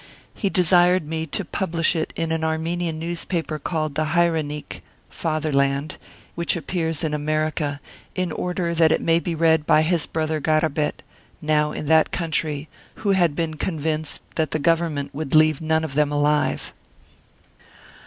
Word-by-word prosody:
He 200 - -1
desired 180 -2 +4
me 160 0 -3
to 190 +5 -2
publish 165 -2 0
it 160 - -1
in 165 -1 -2
an 160 0 -1
Armenian 160 +1 -1
newspaper 165 -1 -3
called 155 -1 -2
Hayrenik 155 - 0 0.3
(Fatherland), 145 -2 0 0.3
which 170 0 0
appears 165 -1 -2
in 155 -2 -1
America, 150 -1 -1 0.4
in 185 -2 -1
order 180 0 -2
that 160 -1 +4
it - - +3
may 165 0 +3
be 170 -1 -3
read 160 -1 +3
by 155 - +5
his 165 -1 +1
brother 155 -1 -1
Garabet, 155 -1 0 0.4
now 150 0 +1
in 150 - -5
that 160 +1 +4
country, 155 -3 -1 0.4
who 200 - +4
had 175 -6 +3
been 160 -2 -2
convinced 155 -2 -3
that 160 -3 +1
the - - 0
Government 160 -2 0
would 150 0 -2
leave 155 -1 +5
none 160 0 +1
of 155 -3 -4
them 150 0 +2
alive. 150 0 +1
160 Hz, 150 wpm, -23 LUFS, 150-170 Hz, 0.4 s, by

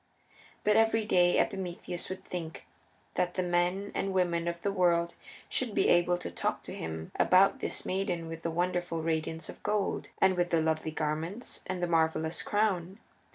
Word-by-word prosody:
But 210 0 +4
every 225 0 +3
day 175 -4 +4
Epimetheus 180 -2 -2
would 185 0 -6
think 165 -3 -6 0.5
that 180 0 0
the 185 - 0
men 180 +3 0
and 195 0 -1
women 170 -2 +1
of 170 0 -3
the 200 - +1
world 170 -3 +2 0.3
should 245 -5 -2
be - - +3
able 175 0 +4
to 180 - -6
talk - - -2
to - - -7
him 80 0 -5
about 185 +2 +5
this - - -2
maiden 185 -3 -1
with 165 0 -7
the 170 - -2
wonderful 175 -1 -1
radiance 160 0 -2
of - - -9
gold, 210 -2 -1
and 185 - +4
with 175 0 +1
the 165 - +3
lovely 160 0 0
garments, 155 +8 -3
and 185 -1 -3
the - - +2
marvelous 160 -1 +1
crown. 195 -3 0
175 Hz, 175 wpm, -30 LUFS, 165-190 Hz, 0.5 s, about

